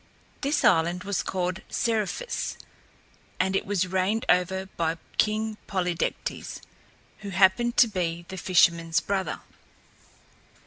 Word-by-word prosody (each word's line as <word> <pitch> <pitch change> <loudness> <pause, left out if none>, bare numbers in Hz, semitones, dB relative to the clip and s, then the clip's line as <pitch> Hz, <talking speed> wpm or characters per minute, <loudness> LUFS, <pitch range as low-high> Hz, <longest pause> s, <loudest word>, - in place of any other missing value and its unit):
This 285 +2 0
island 175 +1 +3
was 200 -2 -1
called 185 +1 -2
Seriphus 230 - -1 0.8
and 190 +1 +1
it - - -1
was 195 -2 +1
reigned 190 +5 0
over 185 +1 +2
by 165 0 0 0.2
King 215 0 +1
Polydectes, 180 -4 -2 0.6
who 205 - -7
happened 195 +5 +3
to 240 - +7
be 170 -4 -3
the 190 - -7
fisherman's 170 -2 +3
brother. 195 -1 -2
190 Hz, 115 wpm, -26 LUFS, 180-210 Hz, 0.8 s, to